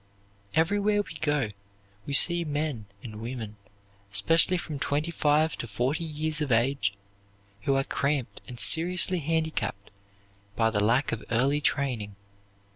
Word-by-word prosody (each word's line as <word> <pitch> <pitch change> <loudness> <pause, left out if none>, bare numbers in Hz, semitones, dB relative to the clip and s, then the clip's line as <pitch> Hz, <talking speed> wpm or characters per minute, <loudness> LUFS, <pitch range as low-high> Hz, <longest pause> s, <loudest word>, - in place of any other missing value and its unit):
Everywhere 205 +5 +2
we 160 - -11
go 145 -8 0 0.6
we 140 - -3
see 175 +4 +6
men 145 -8 -3 0.2
and 110 -2 -8
women, 115 -3 -6 0.5
especially 165 - +3
from 155 -4 -6
twenty 150 +4 -1
five 155 0 +2
to 120 - -4
forty 125 - -1
years 155 -1 -2
of 145 -3 -1
age, 120 -2 +2 0.7
who 135 - +2
are 135 - +2
cramped 140 -2 -2
and 125 -2 -9
seriously 175 +4 +4
handicapped 155 -10 -2 0.6
by 110 -1 +2
the 105 - 0
lack 115 +7 +2
of 115 - -4
early 135 +5 +2
training. 125 -9 -1
140 Hz, 135 wpm, -27 LUFS, 115-160 Hz, 0.7 s, see